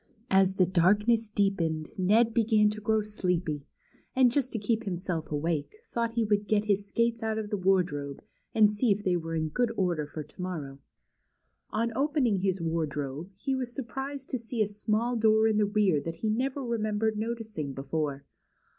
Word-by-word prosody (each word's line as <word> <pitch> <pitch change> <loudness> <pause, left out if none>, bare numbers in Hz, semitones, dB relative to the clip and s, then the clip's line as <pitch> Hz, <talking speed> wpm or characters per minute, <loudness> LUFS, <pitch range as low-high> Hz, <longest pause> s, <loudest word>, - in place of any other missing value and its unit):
As 190 0 +4
the 185 - +4
darkness 210 +6 +3
deepened, 170 -7 0
Ned 220 +5 +3
began 215 -2 +4
to 215 0 -6
grow 220 +1 +1
sleepy, 180 -8 -2 0.5
and 255 -2 +5
just 260 0 0
to - - -1
keep 220 +2 0
himself 180 -4 -3
awake, 155 - -1 0.2
thought 230 -1 -1
he 230 -1 +1
Avould 205 -1 +1
get 210 -1 +2
his 200 -1 +1
skates 230 +2 0
out 220 -1 -1
of 215 -1 -4
the 205 - 0
Avardrobe, 175 -7 +1 0.4
and 215 -2 +6
see 210 +2 +1
if 205 +1 0
they 185 -2 +2
were 165 -1 -3
in 160 -1 -1
good 240 +7 0
order 175 -6 0
for 155 +1 -6
to - - -20
morroAV. 150 -7 -5 0.9
On 230 +2 0
opening 275 -6 +2
his 190 0 0
Avardrobe, 155 -1 -2
he 270 +8 -2
Avas 260 -1 -1
surprised 270 +1 -5
to 255 - -1
see 230 -1 -1
a - - -1
small 215 +4 0
door 220 -1 +4
in 215 -1 +2
the 210 -1 +3
rear 200 -7 +2
that 165 +2 -5
he 215 +6 -1
never 265 +4 -1
remembered 220 -2 0
noticing 220 -9 -4
before. 140 +1 -3
210 Hz, 180 wpm, -29 LUFS, 170-225 Hz, 0.9 s, and